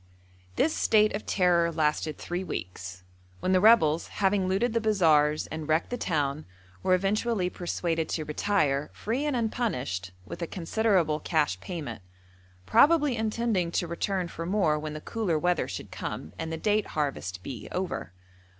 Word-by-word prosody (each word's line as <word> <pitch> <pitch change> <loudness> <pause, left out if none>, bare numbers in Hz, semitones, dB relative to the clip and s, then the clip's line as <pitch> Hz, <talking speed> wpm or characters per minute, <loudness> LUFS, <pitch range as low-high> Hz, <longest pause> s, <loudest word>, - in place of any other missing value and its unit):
This 315 - +2
state 215 -1 +3
of 210 - -6
terror 175 -3 +3
lasted 155 -1 0
three 175 +2 -4
weeks, 90 - -6 0.4
when 185 - 0
the 185 -1 +4
rebels, 180 -8 +5
having 195 -1 +1
looted 200 +6 +1
the 230 - +1
bazaars 155 -8 +3
and 155 -1 -5
wrecked 155 +7 +1
the - - 0
town, 150 - -1 0.4
were 185 - +3
eventually 195 0 0
persuaded 170 -2 -2
to 155 - -2
retire, 150 -4 0
free 245 +7 -2
and 290 - 0
unpunished, 205 - -2 0.2
with 105 - -8
a 170 - -2
considerable 180 -3 +1
cash 150 - 0
payment; 145 - -6 0.6
probably 295 - +5
intending 220 -5 0
to - - +1
return 180 +2 -2
for 165 0 -6
more 180 -6 +2
when 155 0 -5
the 155 - -6
cooler 205 -7 -1
weather 175 +2 +1
should - - -7
come, 80 - -6
and 160 0 -3
the 160 - -3
date 210 +4 +1
harvest 95 -11 -2
be 120 -4 -7
over. 185 - -3
175 Hz, 160 wpm, -28 LUFS, 150-210 Hz, 0.6 s, rebels